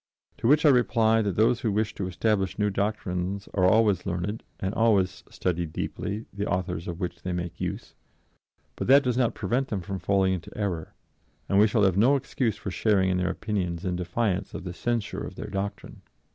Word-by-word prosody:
To -, -, 0 dB
which 150 Hz, +4 st, +5 dB
I -, -, +8 dB
reply 115 Hz, -3 st, +4 dB
that 100 Hz, -4 st, -1 dB
those 115 Hz, +2 st, +3 dB
who 110 Hz, -, 0 dB
wish 105 Hz, +1 st, 0 dB
to 95 Hz, -, -3 dB
establish 95 Hz, +1 st, 0 dB
new 105 Hz, 0 st, +1 dB
doctrines 95 Hz, -1 st, -2 dB
are 90 Hz, -2 st, +2 dB
always 105 Hz, -3 st, +4 dB
learned 95 Hz, +4 st, -2 dB, 0.2 s
and 95 Hz, +1 st, -2 dB
always 100 Hz, -3 st, +2 dB
study 85 Hz, -2 st, -1 dB
deeply 105 Hz, +7 st, -4 dB
the 100 Hz, +1 st, -3 dB
authors 90 Hz, -2 st, -2 dB
of 85 Hz, -1 st, -5 dB
which 90 Hz, -3 st, -4 dB
they 90 Hz, -, -3 dB
make 90 Hz, -1 st, -4 dB
use. -, -, -4 dB, 0.8 s
But -, -, -4 dB
that 140 Hz, +2 st, +7 dB
does 125 Hz, -2 st, 0 dB
not 125 Hz, -2 st, +1 dB
prevent 120 Hz, +7 st, 0 dB
them 100 Hz, -6 st, -3 dB
from 95 Hz, +2 st, -5 dB
falling 95 Hz, -1 st, +2 dB
into 85 Hz, -2 st, -6 dB
error, 95 Hz, -7 st, -3 dB, 0.5 s
and 100 Hz, -, +3 dB
we 105 Hz, -, +7 dB
shall 105 Hz, 0 st, +2 dB
have 95 Hz, -2 st, +3 dB
no 125 Hz, +7 st, +5 dB
excuse 120 Hz, -5 st, -1 dB
for 95 Hz, -, -5 dB
sharing 95 Hz, -1 st, +2 dB
in 90 Hz, -, +1 dB
their 90 Hz, 0 st, 0 dB
opinions 95 Hz, -5 st, -3 dB
in 90 Hz, -1 st, -1 dB
defiance 95 Hz, +2 st, -1 dB
of -, -, -5 dB
the 90 Hz, -2 st, -5 dB
censure 110 Hz, -2 st, -2 dB
of 95 Hz, -, -7 dB
their 105 Hz, -, -7 dB
doctrine." 100 Hz, +1 st, -5 dB
100 Hz, 200 wpm, -27 LUFS, 90-110 Hz, 0.8 s, I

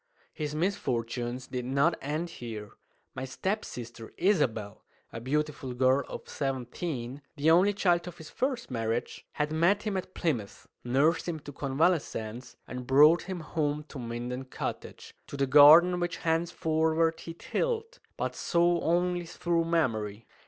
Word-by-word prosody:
His 150 Hz, -1 st, -4 dB
misfortunes 125 Hz, -, -2 dB
did 125 Hz, -1 st, -4 dB
not 140 Hz, +6 st, +2 dB
end 155 Hz, +4 st, -3 dB
here. 110 Hz, -7 st, -7 dB, 0.4 s
My 130 Hz, -, -5 dB
step 195 Hz, +10 st, -2 dB
sister 115 Hz, -2 st, -8 dB
Isabel 115 Hz, -, 0 dB, 0.3 s
a 115 Hz, -, -6 dB
beautiful 140 Hz, -1 st, -2 dB
girl 130 Hz, +2 st, +3 dB
of -, -, -8 dB
seventeen, 135 Hz, 0 st, -4 dB
the 155 Hz, +2 st, +3 dB
only 185 Hz, +5 st, +5 dB
child 180 Hz, -4 st, +1 dB
of 175 Hz, -1 st, -8 dB
his 160 Hz, -, -11 dB
first 255 Hz, -, -2 dB
marriage 115 Hz, 0 st, -3 dB
had 150 Hz, 0 st, -1 dB
met 170 Hz, +6 st, +2 dB
him 210 Hz, -3 st, -2 dB
at 185 Hz, 0 st, -5 dB
Plymouth, 120 Hz, -, -2 dB, 0.2 s
nursed 145 Hz, +8 st, +2 dB
him 160 Hz, -2 st, -3 dB
to 145 Hz, -, -9 dB
convalescence, 135 Hz, -5 st, -1 dB
and 125 Hz, -1 st, -6 dB
brought 150 Hz, +5 st, +6 dB
him 185 Hz, -3 st, -5 dB
home 150 Hz, -1 st, -2 dB
to 140 Hz, -, -8 dB
Minden 120 Hz, +2 st, -4 dB
Cottage, 130 Hz, -, -6 dB
to 140 Hz, -, -7 dB
the 140 Hz, -, +2 dB
garden 160 Hz, +6 st, +8 dB
which 175 Hz, -1 st, -2 dB
henceforward 160 Hz, -1 st, +1 dB
he 165 Hz, -, -8 dB
tilled, 460 Hz, -, -2 dB, 0.2 s
but -, -, -2 dB
saw 170 Hz, 0 st, +2 dB
only 175 Hz, +1 st, +1 dB
through 170 Hz, -1 st, 0 dB
memory. 115 Hz, -10 st, -1 dB
150 Hz, 145 wpm, -29 LUFS, 125-170 Hz, 0.4 s, garden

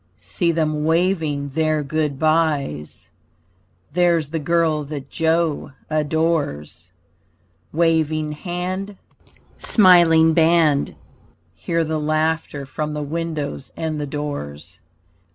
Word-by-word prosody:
See 95 Hz, -, -1 dB
them 155 Hz, -2 st, 0 dB
waving 160 Hz, -4 st, 0 dB
their 155 Hz, +1 st, 0 dB
good 150 Hz, -1 st, -1 dB
byes, 155 Hz, -, 0 dB, 0.8 s
There's 170 Hz, -3 st, +2 dB
the 160 Hz, +1 st, -2 dB
girl 160 Hz, -1 st, +1 dB
that 140 Hz, -2 st, -7 dB
Joe 160 Hz, -3 st, 0 dB, 0.2 s
adores 155 Hz, -, -1 dB, 0.8 s
Waving 155 Hz, -2 st, +1 dB
hand, 185 Hz, +5 st, -4 dB, 0.6 s
smiling 170 Hz, -5 st, +5 dB
band! 160 Hz, -3 st, +3 dB, 0.6 s
Hear 165 Hz, -, -1 dB
the 160 Hz, 0 st, -2 dB
laughter 155 Hz, -1 st, -1 dB
from 150 Hz, +2 st, -4 dB
the 150 Hz, -, -3 dB
windows 150 Hz, -2 st, -4 dB
and 155 Hz, -2 st, -3 dB
the 145 Hz, -, -3 dB
doors. 140 Hz, -, -6 dB
155 Hz, 100 wpm, -21 LUFS, 145-165 Hz, 0.8 s, smiling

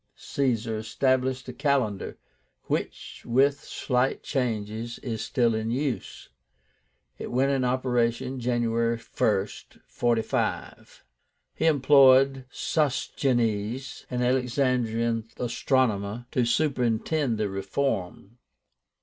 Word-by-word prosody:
Caesar 115 Hz, -5 st, -1 dB
established 130 Hz, +3 st, 0 dB
a 125 Hz, -, -6 dB
calendar, 135 Hz, -8 st, -1 dB, 0.5 s
which, -, -, -4 dB
with 140 Hz, +4 st, +2 dB
slight 125 Hz, 0 st, -1 dB
changes, 115 Hz, -3 st, -2 dB
is 110 Hz, -4 st, -3 dB
still 120 Hz, -1 st, +1 dB
in 110 Hz, 0 st, -2 dB
use. 130 Hz, +1 st, -3 dB, 0.9 s
It -, -, -5 dB
went 135 Hz, +3 st, +2 dB
into 130 Hz, -2 st, +1 dB
operation 125 Hz, 0 st, 0 dB
January 115 Hz, -1 st, 0 dB
1st, 105 Hz, -3 st, -2 dB
45. 115 Hz, -2 st, -2 dB, 0.5 s
He -, -, 0 dB
employed 135 Hz, -2 st, +5 dB
Sosigenes, 125 Hz, -5 st, -1 dB
an 125 Hz, -1 st, -1 dB
Alexandrian 125 Hz, -3 st, 0 dB
astronomer, 120 Hz, -3 st, 0 dB
to 125 Hz, -, +1 dB
superintend 125 Hz, 0 st, +1 dB
the 105 Hz, -1 st, 0 dB
reform. 100 Hz, +1 st, -3 dB
125 Hz, 90 wpm, -26 LUFS, 115-130 Hz, 0.9 s, employed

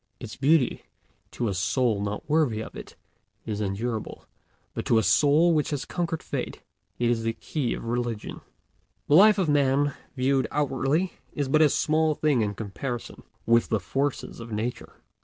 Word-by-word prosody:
Its 115 Hz, -3 st, -8 dB
beauty, 140 Hz, -1 st, +2 dB, 0.5 s
to 120 Hz, -, -3 dB
a 100 Hz, -, -1 dB
soul 100 Hz, +4 st, +1 dB
not 100 Hz, +1 st, -4 dB
worthy 145 Hz, -8 st, +2 dB
of 110 Hz, -, -7 dB
it, -, -, -10 dB, 0.5 s
is 105 Hz, -1 st, -3 dB
unendurable; 110 Hz, +3 st, -3 dB, 0.5 s
but -, -, -4 dB
to 115 Hz, -, +3 dB
a 110 Hz, -, +3 dB
soul 155 Hz, +7 st, +4 dB
which 150 Hz, -2 st, +1 dB
has 145 Hz, -3 st, -3 dB
conquered 170 Hz, -2 st, -3 dB
Fate -, -, -4 dB, 0.4 s
it 120 Hz, -, +1 dB
is 120 Hz, -1 st, +1 dB
the 115 Hz, 0 st, -1 dB
key 135 Hz, 0 st, -3 dB
of -, -, -8 dB
religion. 120 Hz, -2 st, -3 dB, 0.7 s
The -, -, +2 dB
life 210 Hz, +5 st, +7 dB
of 190 Hz, -4 st, +1 dB
Man, 145 Hz, -1 st, +2 dB, 0.2 s
viewed 135 Hz, +1 st, +1 dB
outwardly, 145 Hz, +5 st, 0 dB, 0.2 s
is 145 Hz, -2 st, -2 dB
but 155 Hz, +3 st, +4 dB
a 155 Hz, -, +6 dB
small 155 Hz, +1 st, +1 dB
thing 145 Hz, -6 st, +2 dB
in 105 Hz, -1 st, -1 dB
comparison 115 Hz, +4 st, -5 dB, 0.2 s
with 115 Hz, 0 st, +3 dB
the 110 Hz, -, +1 dB
forces 135 Hz, +9 st, -3 dB
of 115 Hz, 0 st, -9 dB
Nature. 110 Hz, +3 st, -4 dB
130 Hz, 170 wpm, -26 LUFS, 115-150 Hz, 0.7 s, life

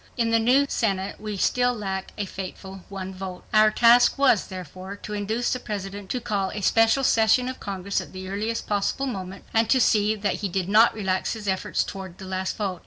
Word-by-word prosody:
In 230 Hz, -1 st, +1 dB
the 230 Hz, -, +4 dB
new 255 Hz, +5 st, +4 dB
Senate 195 Hz, -6 st, -2 dB
we 210 Hz, -1 st, -4 dB
still 245 Hz, +5 st, +2 dB
lacked 190 Hz, -3 st, -4 dB
a 205 Hz, -, -2 dB
fateful 190 Hz, 0 st, -8 dB
one 190 Hz, -1 st, -6 dB
vote. 185 Hz, -1 st, -7 dB
Our 215 Hz, 0 st, +6 dB
task 235 Hz, +4 st, +5 dB
was, 265 Hz, -7 st, +3 dB
therefore, 185 Hz, +2 st, -8 dB
to 210 Hz, +1 st, -8 dB
induce 215 Hz, +4 st, -1 dB
the 255 Hz, -, -3 dB
President 200 Hz, -3 st, -6 dB
to 250 Hz, -, -1 dB
call 200 Hz, -4 st, -1 dB
a 210 Hz, -, -5 dB
special 225 Hz, +6 st, +3 dB
session 230 Hz, +1 st, +3 dB
of 255 Hz, -, -5 dB
Congress 200 Hz, 0 st, -3 dB
at -, -, -11 dB
the 185 Hz, 0 st, -8 dB
earliest 215 Hz, +4 st, -3 dB
possible 205 Hz, +6 st, -1 dB
moment, 195 Hz, -6 st, -6 dB
and 225 Hz, 0 st, +2 dB
to 260 Hz, -, +4 dB
see 215 Hz, -2 st, +3 dB
that 205 Hz, -2 st, -1 dB
he 200 Hz, -, -1 dB
did 180 Hz, 0 st, -2 dB
not 220 Hz, +3 st, +5 dB
relax 190 Hz, -3 st, -1 dB
his 215 Hz, -3 st, -7 dB
efforts 190 Hz, -1 st, 0 dB
toward 190 Hz, -2 st, -8 dB
the 190 Hz, -, -9 dB
last 185 Hz, 0 st, -3 dB
vote. 195 Hz, -4 st, -3 dB
205 Hz, 210 wpm, -25 LUFS, 190-225 Hz, -, Our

